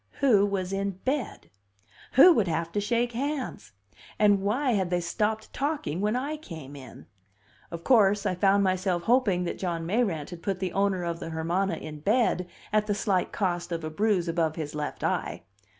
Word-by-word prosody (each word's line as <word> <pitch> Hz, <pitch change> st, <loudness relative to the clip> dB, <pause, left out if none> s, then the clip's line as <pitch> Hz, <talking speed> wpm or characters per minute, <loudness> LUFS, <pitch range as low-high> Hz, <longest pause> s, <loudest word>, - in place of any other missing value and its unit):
Who 215 Hz, -8 st, +4 dB
was 195 Hz, -2 st, -2 dB
in 195 Hz, -1 st, -2 dB
bed 265 Hz, -3 st, -3 dB, 0.6 s
who 345 Hz, +7 st, +8 dB
would 215 Hz, -, +1 dB
have 165 Hz, 0 st, -2 dB
to 205 Hz, -, -1 dB
shake 235 Hz, +3 st, 0 dB
hands? 260 Hz, -, -4 dB, 0.4 s
And 205 Hz, -2 st, +4 dB
why 250 Hz, +7 st, +1 dB
had 190 Hz, -5 st, 0 dB
they 180 Hz, 0 st, +1 dB
stopped 215 Hz, +5 st, -2 dB
talking 275 Hz, -, -2 dB
when 210 Hz, +3 st, +1 dB
I 285 Hz, +5 st, -2 dB
came 160 Hz, -, -10 dB
in? 135 Hz, -2 st, -12 dB, 0.6 s
Of 170 Hz, -1 st, -7 dB
course, 210 Hz, -5 st, +4 dB
I 190 Hz, -, +1 dB
found 195 Hz, +2 st, +3 dB
myself 185 Hz, -2 st, 0 dB
hoping 225 Hz, -7 st, +2 dB
that 175 Hz, -, -4 dB
John 170 Hz, -3 st, -2 dB
Mayrant 185 Hz, -6 st, -1 dB
had 175 Hz, -1 st, -8 dB
put 195 Hz, 0 st, -2 dB
the 185 Hz, -2 st, -3 dB
owner 195 Hz, -2 st, +1 dB
of 170 Hz, -1 st, -3 dB
the 165 Hz, -, -6 dB
Hermana 170 Hz, +4 st, -1 dB
in 155 Hz, -1 st, -8 dB
bed 200 Hz, 0 st, +1 dB, 0.3 s
at 215 Hz, 0 st, +2 dB
the 205 Hz, -, 0 dB
slight 195 Hz, -3 st, 0 dB
cost 175 Hz, -3 st, -2 dB
of 165 Hz, -1 st, -3 dB
a 155 Hz, -, -4 dB
bruise 195 Hz, 0 st, +1 dB
above 165 Hz, -2 st, 0 dB
his 155 Hz, -3 st, -5 dB
left 150 Hz, -1 st, -4 dB
eye. -, -, -2 dB
195 Hz, 185 wpm, -27 LUFS, 170-215 Hz, 0.6 s, who